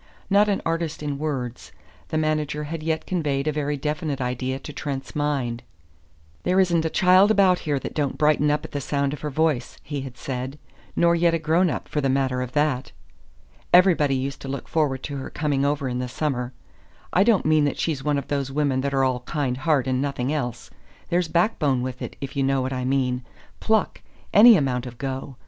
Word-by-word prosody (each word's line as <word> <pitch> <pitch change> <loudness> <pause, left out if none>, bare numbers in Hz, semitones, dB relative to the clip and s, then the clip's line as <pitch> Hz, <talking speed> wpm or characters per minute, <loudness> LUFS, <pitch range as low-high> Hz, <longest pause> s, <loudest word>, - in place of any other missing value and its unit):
Not 205 +1 +5
an 200 - 0
artist 165 -2 -2
in 145 -2 -3
words, 130 -6 -4 0.4
the 155 - -2
manager 155 -1 0
had 155 +2 -5
yet 160 0 -1
conveyed 150 -6 -1
a - - +3
very 145 -1 -2
definite 150 0 -2
idea 130 +1 -2
to 150 +2 -9
Trent's 135 -2 -5
mind. 135 -6 -1 0.8
"There 185 +1 +2
isn't 170 -3 +3
a - - +1
child 185 +4 +5
about 195 -4 +4
here 145 -3 -1
that - - -5
don't 145 -3 -1
brighten 150 -1 +3
up 150 +1 0
at - - -9
the 145 - -3
sound 140 0 -1
of 150 - -7
her 150 - -3
voice," 150 -4 0
he 145 -1 -4
had 130 -2 -8
said, 130 +2 -5 0.4
"nor 170 0 +4
yet 170 0 +3
a - - +2
grown 165 +3 +2
up, - - -4
for 150 - -1
the 135 - +1
matter 130 -1 +1
of 125 -1 -5
that. 145 -3 0 0.8
Everybody 175 -6 +5
used 135 +1 -3
to - - -7
look 135 0 -5
forward 140 -5 0
to 145 -1 -4
her 130 - -6
coming 145 -3 -1
over 140 -1 0
in 125 0 -2
the 125 - -2
summer. 125 -3 -2 0.6
I 185 - +5
don't 215 -3 +3
mean 155 -1 +4
that 145 - -1
she's 150 -5 -2
one 150 0 +1
of 140 - -4
those 140 -2 -2
women 140 -2 +1
that 140 0 -1
are 135 - +3
all 130 -1 +1
kind 140 -5 -1
heart 135 0 +1
and 130 -1 0
nothing 140 -1 -1
else. 125 -5 -4 0.4
There's 175 0 +1
backbone 155 - +1
with 130 0 -5
it, - - -6
if 135 0 -6
you 140 - 0
know 135 -1 +1
what 130 +1 -2
I 125 -1 -2
mean 130 -1 0 0.4
pluck 220 -1 +1 0.3
any 220 +1 +9
amount 130 -4 -1
of 120 -1 -10
go. 135 0 -5
145 Hz, 210 wpm, -24 LUFS, 130-155 Hz, 0.8 s, any